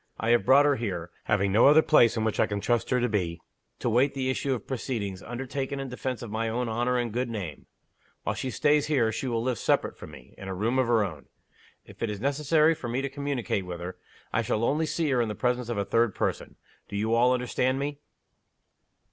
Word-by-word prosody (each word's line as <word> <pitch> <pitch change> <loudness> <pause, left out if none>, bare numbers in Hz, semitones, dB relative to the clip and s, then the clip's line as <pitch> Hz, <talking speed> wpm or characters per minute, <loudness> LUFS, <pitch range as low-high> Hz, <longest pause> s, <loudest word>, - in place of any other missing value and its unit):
I 115 +2 +1
have 120 -4 +3
brought 140 +4 +6
her 145 -1 +3
here 90 -7 -4
having 100 +1 +1
no 110 +6 +6
other 155 +2 +7
place 120 -7 +5
in 110 - 0
which 110 -1 -1
I - - +4
can 105 -1 -2
trust 120 +3 0
her 125 - +2
to 125 - +1
be 90 -7 -1 0.4
to - - -3
wait 125 +5 +2
the 130 -1 0
issue 135 0 -1
of 115 - -8
proceedings, 110 -7 -4
undertaken 135 +4 -4
in 135 -1 -4
defense 125 -1 -4
of 115 - -7
my 115 +1 -1
own 120 +2 -1
honor 120 +3 0
and 120 -3 -2
good 125 +1 -1
name. 95 -10 -6 0.6
While - - -1
she 130 - -4
stays 150 +2 +2
here, 125 -7 +2
she 110 +4 -3
will 115 -2 -1
live 125 -2 -1
separate - - +1
from - - -10
me, - - -14
in 95 - -8
a 95 - -4
room 115 +7 0
of 130 - +2
her 115 -3 +3
own. 80 -8 -6 0.6
If - - -16
it 115 - 0
is 105 -1 -4
necessary 150 +5 +3
for 130 - -7
me 130 +3 -1
to 140 - -2
communicate 135 -9 -2
with 90 -1 -5
her, 90 +1 -6 0.4
I - - +2
shall 110 - -1
only 155 +6 +1
see 165 0 -1
her 125 -2 +3
in 115 - -1
the 105 - -4
presence 125 0 -1
of 120 - -2
a 100 - 0
third 115 -1 +1
person. - - -2 0.3
Do 100 - -6
you 110 +3 0
all 120 +2 +4
understand 125 +1 0
me?" 140 +1 -3
120 Hz, 240 wpm, -27 LUFS, 110-135 Hz, 0.6 s, other